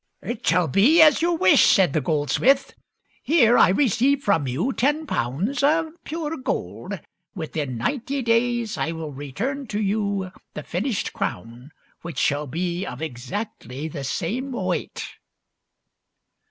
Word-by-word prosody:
" - - -49
It 235 - -7
shall 175 0 +3
be 245 - +4
as 305 -2 +7
you 345 +1 +2
wish," 185 - +5
said 185 -7 +4
the 155 - +1
goldsmith. 160 - +2 0.2
" - - -53 0.2
Here 245 -7 +4
I - - +6
receive 265 +6 +2
from 165 -9 +2
you 140 - -1
ten 295 +4 +1
pounds 195 - -1
of 320 +3 +2 0.2
pure 325 0 -4
gold; 260 - -4 0.4
within 150 -7 -4
ninety 270 - -2
days 230 -1 +1
I 165 - -1
will 160 -2 -6
return 210 - -4
to 210 -1 -3
you 200 -2 -1 0.2
the - - -5
finished - - -2
crown 120 +8 -5 0.3
which 170 -1 -8
shall 145 +1 +1
be 175 +5 -2
of 160 - -6
exactly 135 - -5
the 145 -3 -6
same 210 - -3
weight." 185 -6 -3
200 Hz, 145 wpm, -23 LUFS, -, 0.4 s, as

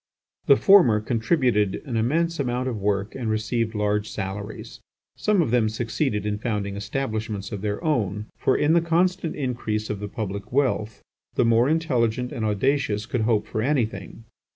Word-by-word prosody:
The 140 - +8
former 135 - +6
contributed 115 - +1
an 125 -5 -4
immense 165 +9 +1
amount 125 -1 -1
of 115 -4 -3
work 100 +1 0
and 120 -4 -3
received 110 +1 -1
large 105 0 0
salaries. 100 +1 -6 0.4
Some 210 -5 +2
of 125 - -3
them 120 -3 +3
succeeded 110 -1 -2
in 105 0 -2
founding 105 -3 -2
establishments 110 -1 -3
of 100 -3 -5
their 105 0 -3
own; 105 - 0
for 130 - +1
in 150 +2 +3
the 170 - +4
constant 170 +1 +1
increase 115 -6 -2
of 105 - -4
the 105 0 -5
public 100 -1 -5
wealth 120 -6 0 0.3
the - - +3
more 115 +3 +4
intelligent 125 -7 0
and 120 -6 -4
audacious 110 0 0
could 120 0 -2
hope 110 -1 +1
for 110 - -3
anything. 115 -6 -2
115 Hz, 165 wpm, -24 LUFS, 105-135 Hz, 0.4 s, The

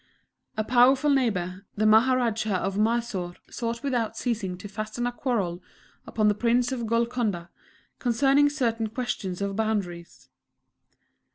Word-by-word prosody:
A 215 - +1
powerful 255 +5 +4
neighbour, 195 -8 0
the 215 - +1
Maharajah 225 -2 +3
of 190 +1 -1
Mysore 215 -5 0 0.2
sought 235 +1 -4
without 245 -5 -1
ceasing 210 -7 -2
to 205 - -8
fasten 215 +3 -4
a 245 - 0
quarrel 205 -9 -2 0.5
upon 215 -1 +1
the 210 - +4
Prince 240 +3 +1
of 240 -3 -3
Golconda, 230 -6 -1 0.5
concerning 270 +4 +3
certain 235 -6 -1
questions 205 -5 -3
of 200 0 -2
boundaries. 195 -6 -3
225 Hz, 125 wpm, -26 LUFS, 200-245 Hz, 0.5 s, powerful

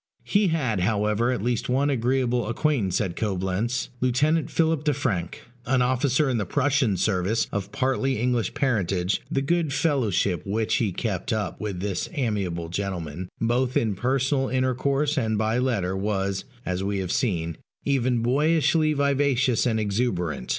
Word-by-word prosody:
He 205 0 +2
had, 130 - 0
however, 105 +4 +1
at 125 -6 -2
least 120 0 -1
one 135 +3 +2
very - - +2
agreeable 125 -1 0
acquaintance 120 - 0
at 95 -5 -2
Coblentz 100 +4 -1
Lieutenant 145 +6 +2
Philip 160 -2 +1
de 150 -3 +1
Franck, 100 - -2 0.2
an 130 -1 +3
officer 130 +3 +2
in 125 -3 0
the 105 - -1
Prussian 140 -6 +1
service, 95 +3 +1
of 100 0 -3
partly 135 +1 0
English 120 -3 0
parentage: 100 -7 0
the 135 - 0
good 165 0 +1
fellowship 110 - +1
which 110 +2 0
he 110 -5 0
kept 95 -1 -3
up 110 -3 -2
with 100 -4 -4
this 100 -2 -2
amiable 100 - -2
gentleman, 90 -3 -4
both 120 +3 +1
in 110 -3 +1
personal 130 +5 0
intercourse 135 +3 +1
and 110 -3 0
by 110 +3 +1
letter, 105 -8 0
was 100 -1 -1 0.2
(as 90 +1 -2
we 100 0 -1
have 95 -2 -2
seen) 85 -10 0 0.3
even 130 -4 +1
boyishly 155 +4 +3
vivacious 140 -4 +2
and 110 -2 +1
exuberant. 100 - -1
120 Hz, 155 wpm, -25 LUFS, 100-135 Hz, 0.3 s, an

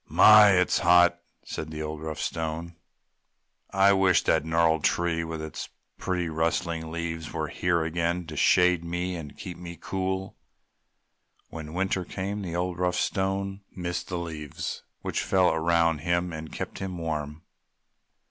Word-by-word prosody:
"My! 105 -2 +8
It's 90 -1 +3
hot!" 90 0 +5 0.3
said 80 - -5
the 80 0 -5
old, 75 0 -5
rough 80 -1 -5
Stone, 80 +1 -3 0.9
"I 100 +1 +5
wish 95 -2 +4
the - - +3
gnarled 80 0 +2
tree 85 -1 +1
with 80 -1 -5
its 80 - -6 0.3
pretty 90 -2 -1
rustling 80 0 -1
leaves 80 -1 -4
were - - -3
here 85 -2 0
again 85 +2 -1
to 80 -1 -8
shade 90 +2 +4
me 90 +2 -3
and 75 -4 -8
keep 90 -2 -7
me 85 -1 -8
cool!" 95 +1 -3 1.1
When 80 -1 -8
winter 95 0 0
came 100 +3 -4
the 85 -3 -4
old, 90 0 -2
rough 90 0 +1
Stone 95 +1 -1
missed 90 -1 -3
the 90 - -3
leaves 80 -4 -5 0.2
which - - -1
fell 95 -2 +3
around 85 0 +2
him 85 +2 0
and 80 0 -7
kept - - -6
him 95 -2 -4
warm. 75 -2 -4
85 Hz, 150 wpm, -27 LUFS, 80-90 Hz, 1.1 s, My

